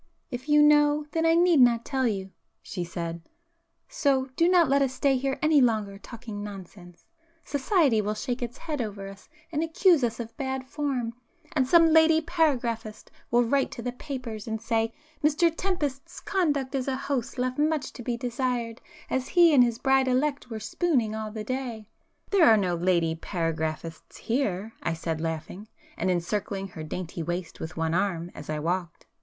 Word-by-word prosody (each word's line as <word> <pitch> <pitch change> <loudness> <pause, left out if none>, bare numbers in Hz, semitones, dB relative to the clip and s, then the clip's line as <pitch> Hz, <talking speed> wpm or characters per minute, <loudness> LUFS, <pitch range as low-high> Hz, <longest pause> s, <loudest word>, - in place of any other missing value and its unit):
"If 255 +4 -6
you 295 0 +6
know, 295 0 +4
then 325 0 +1
I 325 - +5
need 345 -2 +5
not 235 -2 +5
tell 265 -3 0
you"—she 190 -3 -6
said—"So, 280 - -4
do 335 +1 +3
not 355 -3 +5
let 280 +1 +3
us 265 -1 0
stay 275 +1 +2
here 270 +1 -1
any 305 -2 +5
longer 215 -5 +1
talking 220 -2 -8
nonsense;—'society' 260 - -2
will 210 +1 -2
shake 245 +3 -3
its 240 0 -4
head 300 -5 -4
over 200 -3 -5
us 195 0 -14 0.2
and 305 -1 -1
accuse 330 -2 +3
us 230 -1 -1
of 230 -1 -6
'bad 265 -2 -3
form,' 265 -5 -2 0.4
and 265 -4 +2
some 330 +2 +6
lady 320 0 +6
paragraphist 255 -10 -1 0.2
will 240 +1 +4
write 270 +4 +1
to 235 - -7
the 245 - -2
papers, 245 -5 -6
and, 220 0 -2
say—'Mr 300 +8 0
Tempest's 300 -8 -3
conduct 290 -9 0
as 265 -1 -1
a 265 - 0
host 270 -2 -3
left 255 +2 -1
much 305 -2 0
to - - -9
be 240 0 -2
desired, 245 -1 -2 0.3
as 260 0 -1
he 345 -3 +5
and 260 -3 +7
his 235 -2 0
bride 265 +1 +3
elect 270 +1 0
were 220 -2 -5
"spooning" 240 - 0
all 220 0 -4
the 215 0 -6
day.'" 240 -3 -4 0.4
[p 400 - +2
271]"There 330 - +7
are 220 - +6
no 185 -4 0
lady 170 -1 +1
paragraphists 165 -1 -4
here,"—I 215 -7 -2
said 160 -1 -3
laughing, 165 +5 -5 0.3
and - - -1
encircling 195 +2 -2
her 160 - -9
dainty 170 +2 -5
waist 175 +1 -4
with 160 +2 -7
one 165 0 0
arm 175 -2 -1
as 150 - -10
I 155 - -1
walked. 170 +2 -3
245 Hz, 170 wpm, -27 LUFS, 200-295 Hz, 0.4 s, and